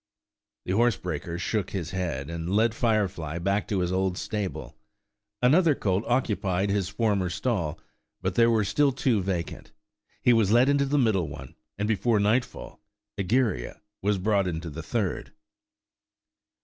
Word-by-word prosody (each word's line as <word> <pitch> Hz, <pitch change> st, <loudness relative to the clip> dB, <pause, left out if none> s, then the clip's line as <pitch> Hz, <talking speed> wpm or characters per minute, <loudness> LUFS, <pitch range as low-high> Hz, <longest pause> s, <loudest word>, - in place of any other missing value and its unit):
The -, -, -2 dB
horsebreaker 90 Hz, -7 st, 0 dB
shook 95 Hz, +2 st, -1 dB
his 90 Hz, -5 st, -4 dB
head, 85 Hz, -7 st, -3 dB
and 85 Hz, +1 st, -5 dB
led 110 Hz, +1 st, +3 dB
Firefly 100 Hz, -9 st, 0 dB
back 100 Hz, +4 st, 0 dB
to 100 Hz, -4 st, 0 dB
his 90 Hz, 0 st, -1 dB
old 95 Hz, -1 st, 0 dB
stable. 105 Hz, -3 st, -4 dB, 0.7 s
Another 155 Hz, +4 st, +5 dB
colt 95 Hz, -2 st, 0 dB
occupied 100 Hz, -6 st, 0 dB
his 100 Hz, -2 st, 0 dB
former 105 Hz, -4 st, 0 dB
stall, 85 Hz, -6 st, -2 dB, 0.4 s
but 95 Hz, 0 st, -2 dB
there 115 Hz, +3 st, +4 dB
were 110 Hz, -2 st, +3 dB
still 140 Hz, +8 st, +2 dB
two 125 Hz, -5 st, +1 dB
vacant. 90 Hz, -4 st, -4 dB, 0.5 s
He 125 Hz, -, +6 dB
was 110 Hz, -4 st, +3 dB
led 120 Hz, +4 st, +5 dB
into 140 Hz, 0 st, +3 dB
the 145 Hz, +2 st, +1 dB
middle 110 Hz, -, +2 dB
one, 70 Hz, -2 st, -9 dB, 0.2 s
and 105 Hz, +1 st, -1 dB
before 110 Hz, +1 st, +2 dB
nightfall 110 Hz, +5 st, -1 dB, 0.4 s
Egeria 100 Hz, -, 0 dB, 0.2 s
was 100 Hz, +1 st, +1 dB
brought 100 Hz, 0 st, +1 dB
into 85 Hz, -1 st, -4 dB
the 80 Hz, +3 st, -6 dB
third. 100 Hz, +3 st, -3 dB
100 Hz, 150 wpm, -26 LUFS, 90-115 Hz, 0.7 s, He